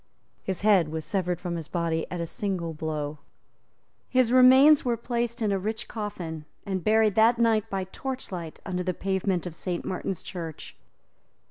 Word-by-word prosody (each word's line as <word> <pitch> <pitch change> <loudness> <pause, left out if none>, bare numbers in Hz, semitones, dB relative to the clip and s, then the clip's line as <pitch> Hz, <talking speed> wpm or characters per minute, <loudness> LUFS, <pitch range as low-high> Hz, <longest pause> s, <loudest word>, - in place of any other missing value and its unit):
His 190 -2 -3
head 200 -5 +4
was 160 0 -4
severed 180 -4 -1
from 175 -1 -4
his 160 -2 -6
body 165 -2 -1
at 180 - -4
a 170 - -1
single 175 -2 -3
blow. 150 -1 -4 0.9
His 255 -2 +3
remains 260 +4 +7
were 240 -2 0
placed 235 0 -2
in 210 - +1
a 195 - +1
rich 220 +4 -3
coffin, 175 -8 -5 0.2
and 190 -3 -2
buried 215 -1 +4
that 225 +3 +5
night, 225 -2 +2
by 195 -1 -2
torchlight, 185 -6 -6
under 180 -2 -2
the 180 -1 -2
pavement 190 -2 -1
of 175 - -5
Saint 175 +1 -4
Martin's 185 -1 -3
Church. 165 -4 -7
190 Hz, 165 wpm, -27 LUFS, 170-225 Hz, 0.9 s, remains